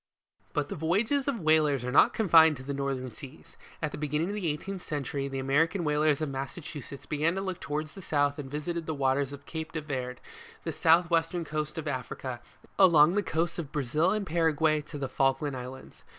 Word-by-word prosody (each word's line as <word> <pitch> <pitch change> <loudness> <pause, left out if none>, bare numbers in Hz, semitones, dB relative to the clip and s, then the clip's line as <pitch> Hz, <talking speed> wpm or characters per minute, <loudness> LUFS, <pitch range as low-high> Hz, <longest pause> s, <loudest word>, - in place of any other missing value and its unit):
But 145 -1 -1
the - - -4
voyages 215 - +1
of 250 -7 -1
whalers 155 -5 +3
are 125 - -2
not 140 - +6
confined 160 -7 +5
to 130 - -10
the 140 +1 -4
northern 135 -2 -3
seas. 135 +5 -13 0.3
At 155 - 0
the - - -7
beginning 150 +3 -1
of - - -3
the 205 -5 -2
eighteenth 185 +6 -4
century, 140 -3 -3
the 135 -1 -5
American 155 +7 +1
whalers 150 -1 +2
of 155 - -2
Massachusetts 140 0 -6
began 155 +4 0
to 195 - -2
look 185 -2 -4
towards 150 +1 -4
the 195 - -10
south 145 -3 +1
and 135 -2 -6
visited 160 +3 -4
the 160 - -2
waters 135 0 +1
of 140 0 -10
Cape 160 -1 -5
de 155 - -2
Verd, 130 -4 -4 0.4
the - - -2
south 170 +2 +4
western 165 +1 +1
coast 155 0 -3
of 160 -1 -4
Africa, 130 -2 -4 0.4
along 170 -4 +7
the 205 - +2
coasts 170 -2 -1
of 150 -4 -5
Brazil 150 +5 +1
and 210 +1 0
Paraguay 160 -2 +2
to 150 0 -9
the 140 -1 -2
Falkland 135 +2 0
islands. 130 +1 -9
150 Hz, 205 wpm, -29 LUFS, 140-165 Hz, 0.4 s, along